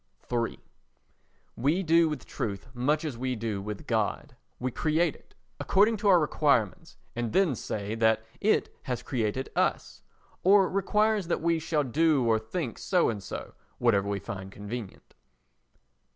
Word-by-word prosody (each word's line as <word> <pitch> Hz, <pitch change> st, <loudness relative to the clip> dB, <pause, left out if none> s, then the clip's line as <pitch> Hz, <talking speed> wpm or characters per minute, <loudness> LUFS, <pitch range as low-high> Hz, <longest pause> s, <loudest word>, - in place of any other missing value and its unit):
iii 120 Hz, -1 st, -1 dB, 1.0 s
We 150 Hz, +10 st, +1 dB
do 165 Hz, -1 st, +4 dB
with 150 Hz, -5 st, -5 dB
truth 100 Hz, -3 st, -4 dB
much 145 Hz, +6 st, 0 dB
as 130 Hz, -7 st, -4 dB
we 130 Hz, 0 st, -1 dB
do 110 Hz, -3 st, -3 dB
with 105 Hz, 0 st, -6 dB
God. -, -, -1 dB, 0.2 s
We 125 Hz, +1 st, -2 dB
create 155 Hz, +3 st, +1 dB
it -, -, -22 dB, 0.2 s
according 210 Hz, +3 st, +3 dB
to 205 Hz, 0 st, -1 dB
our 195 Hz, -, +7 dB
own 170 Hz, -, +4 dB
requirements 140 Hz, -9 st, 0 dB, 0.2 s
and 120 Hz, -2 st, -2 dB
then 190 Hz, -7 st, +3 dB
say 105 Hz, -3 st, -4 dB
that 110 Hz, -1 st, +2 dB, 0.2 s
it 215 Hz, +2 st, +1 dB
has 125 Hz, -3 st, -3 dB
created 120 Hz, +1 st, -2 dB
us, -, -, -1 dB, 0.4 s
or 195 Hz, 0 st, +6 dB
requires 210 Hz, 0 st, +1 dB
that 170 Hz, -, -1 dB
we 165 Hz, -1 st, +2 dB
shall 160 Hz, -2 st, 0 dB
do 145 Hz, 0 st, +2 dB
or 110 Hz, -1 st, +3 dB
think 115 Hz, +3 st, -4 dB
so 180 Hz, -2 st, +2 dB
and 105 Hz, -3 st, -3 dB
so—whatever 100 Hz, +2 st, -2 dB
we 100 Hz, -, -1 dB
find 95 Hz, -1 st, -7 dB
convenient. 105 Hz, +1 st, -8 dB
130 Hz, 150 wpm, -28 LUFS, 110-165 Hz, 1.0 s, our